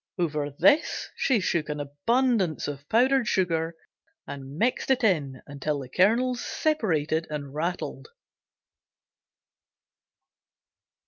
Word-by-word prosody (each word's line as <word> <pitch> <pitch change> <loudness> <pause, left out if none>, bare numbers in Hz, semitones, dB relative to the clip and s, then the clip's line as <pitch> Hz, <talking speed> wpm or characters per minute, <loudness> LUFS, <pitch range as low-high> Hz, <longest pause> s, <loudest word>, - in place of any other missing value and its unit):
Over 150 -4 -1
this 290 - +2
she 255 -5 +2
shook 170 -4 -1
an 150 0 -3
abundance 185 - 0
of 140 -1 -7
powdered 255 +1 +3
sugar 165 -3 0 0.5
and 140 0 -8
mixed 245 +7 0
it 260 -2 +2
in 145 - +1
until 145 +1 -3
the 135 -3 -7
kernels 235 - +2
separated 165 - 0
and 145 -2 -5
rattled. 170 - -3
165 Hz, 105 wpm, -26 LUFS, 145-235 Hz, 0.5 s, powdered